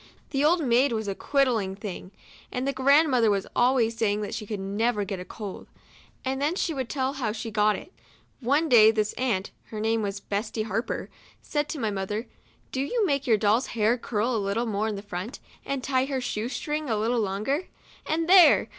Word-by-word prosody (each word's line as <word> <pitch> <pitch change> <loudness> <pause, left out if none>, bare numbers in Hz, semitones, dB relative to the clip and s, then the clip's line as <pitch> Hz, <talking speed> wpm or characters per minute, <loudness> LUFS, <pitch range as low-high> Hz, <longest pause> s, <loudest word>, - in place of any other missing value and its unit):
The 275 0 +1
old 330 +2 +3
maid 250 +3 +3
was 220 -2 -2
a 200 - -1
quiddling 230 -6 +1
thing, 195 -2 -7 0.4
and 255 +2 -2
the 275 - 0
grand 280 +4 +4
mother 235 -4 +4
was 200 -2 +1
always 240 -2 +3
saying 210 -2 0
that 205 - -4
she 215 -1 -5
could 210 -2 -4
never 205 +2 0
get 195 0 -4
over - - -6
a - - -8
cold; 205 -2 -8 0.6
and 265 +1 -1
then 300 +5 +1
she 345 -3 -1
would 265 -4 -3
tell 265 -1 -1
how 250 -6 -2
she 225 +1 -5
had - - -12
got 210 0 +3
it. 360 - -10 0.5
One 285 +6 +2
day 225 -6 +7
this 215 -1 0
aunt 230 -7 -1
(her 215 - -7
name 225 +1 +1
was 200 -1 -3
Betsy 215 +2 -3
Harper) 220 +2 -3 0.3
said 295 -1 -1
to 310 - -4
my 220 -4 0
mother, 205 +3 -3 0.2
" - - -35
Do 270 +2 -2 0.2
make 280 -6 0
your 225 -3 +5
doll's 215 +4 +2
hair 220 +2 +3
curl 235 0 -1
a - - +1
little 200 +4 -1
more 215 -1 -1
to 210 - -3
the 200 - -7
front, 205 +4 -5 0.3
and 275 -2 -2
tie 260 -1 +1
her 270 -1 -2
shoe 235 -2 -3
string 300 +1 -3
a 220 - +1
little 230 +3 +1
longer; 215 - -1 0.4
and 325 +1 0
there 365 -1 +7
230 Hz, 215 wpm, -26 LUFS, 210-270 Hz, 0.6 s, day